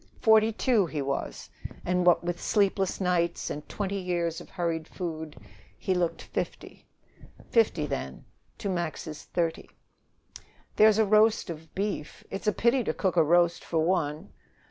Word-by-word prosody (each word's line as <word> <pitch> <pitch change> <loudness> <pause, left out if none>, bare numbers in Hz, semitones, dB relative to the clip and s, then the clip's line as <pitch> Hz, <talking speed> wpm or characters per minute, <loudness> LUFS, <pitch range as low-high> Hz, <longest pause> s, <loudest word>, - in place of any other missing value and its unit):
Forty 220 -1 +5
two 220 -4 +2
he 155 - -4
was, 135 0 -4 0.3
and, 180 0 +1
what 175 - +5
with 175 0 -3
sleepless 195 -2 +1
nights 175 -2 0
and 150 +1 -7
twenty 200 -1 -3
years 175 -3 -2
of - - -13
hurried 165 -3 -2
food, 160 -4 -6 0.4
he 190 - -1
looked 175 -2 -1
fifty. - - -6 0.6
Fifty, 460 - +3
then, - - -5 0.3
to 205 - -4
Max's 170 -4 -4
thirty. 165 -2 -2 1.1
"There's 215 0 +6
a 220 - +4
roast 215 -2 +3
of 160 -1 -11
beef. 200 -6 -3
It's 195 - -5
a - - +5
pity 240 +4 +2
to - - -1
cook 190 -3 0
a 165 - +5
roast 170 +2 +3
for 165 - -3
one." 165 0 -1
180 Hz, 150 wpm, -28 LUFS, 165-205 Hz, 1.1 s, There's